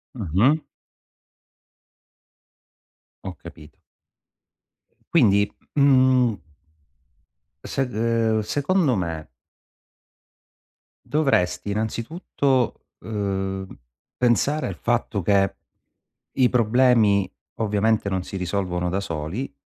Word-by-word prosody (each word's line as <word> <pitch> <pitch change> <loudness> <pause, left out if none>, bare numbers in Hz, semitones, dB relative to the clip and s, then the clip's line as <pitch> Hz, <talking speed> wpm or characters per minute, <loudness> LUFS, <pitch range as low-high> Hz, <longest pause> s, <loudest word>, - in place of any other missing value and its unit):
Mh-mh. 110 - +2 2.6
Ho - - -5
capito. 75 -1 -13 1.4
Quindi, 105 -10 +4 0.3
m 145 - +2
mhmm 130 -4 +4 1.3
sed 135 -2 -2
ehm, 115 0 +1
secondo 145 - +1
me 85 -4 -4 1.8
dovresti 125 - 0
innanzitutto, 125 - -1 0.2
ehm, 95 -2 -3 0.5
pensare 125 +5 +1
al 95 - -5
fatto 120 -3 -1
che 95 +1 +2 0.8
i 130 -2 +3
problemi 115 -5 +3 0.2
ovviamente 105 -1 0
non 95 -2 -2
si 95 - -9
risolvono 90 -1 -2
da 95 +3 -1
soli, 85 - -5
110 Hz, 75 wpm, -23 LUFS, 95-130 Hz, 2.6 s, Quindi